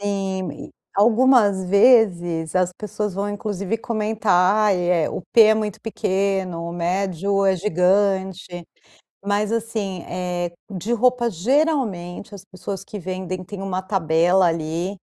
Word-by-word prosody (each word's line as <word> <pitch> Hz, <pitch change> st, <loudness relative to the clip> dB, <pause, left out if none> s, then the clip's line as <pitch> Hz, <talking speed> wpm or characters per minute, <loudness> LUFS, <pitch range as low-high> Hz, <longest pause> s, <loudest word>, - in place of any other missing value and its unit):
Sim, 195 Hz, -2 st, -2 dB
e -, -, -10 dB, 0.2 s
algumas 215 Hz, -2 st, +4 dB
vezes, 180 Hz, -6 st, +3 dB
as 180 Hz, -1 st, +2 dB
pessoas 210 Hz, -1 st, -4 dB
vão 200 Hz, +1 st, -2 dB
inclusive 205 Hz, 0 st, -3 dB
comentar, 210 Hz, -2 st, +2 dB
e -, -, -1 dB
é, 170 Hz, -4 st, +1 dB
"o -, -, -5 dB
P 230 Hz, -, +8 dB
é 220 Hz, 0 st, +6 dB
muito 215 Hz, -2 st, -3 dB
pequeno, 190 Hz, -5 st, -2 dB
o -, -, -7 dB
médio 190 Hz, +2 st, -1 dB
é 190 Hz, -1 st, +3 dB
gigante". 190 Hz, -1 st, 0 dB, 0.6 s
Mas, 205 Hz, +1 st, 0 dB
assim, 215 Hz, -5 st, -3 dB
eh, 175 Hz, -1 st, -3 dB, 0.2 s
de 200 Hz, +5 st, -3 dB
roupa, 240 Hz, 0 st, +2 dB
geralmente, 215 Hz, -, -1 dB
as 195 Hz, -, -12 dB
pessoas 185 Hz, 0 st, -7 dB
que 210 Hz, -, -8 dB
vendem, 185 Hz, 0 st, -5 dB
têm 195 Hz, +1 st, -8 dB
uma 190 Hz, -1 st, -3 dB
tabela, 180 Hz, -1 st, +2 dB
ali, 165 Hz, +3 st, -2 dB
195 Hz, 135 wpm, -21 LUFS, 180-210 Hz, 0.6 s, P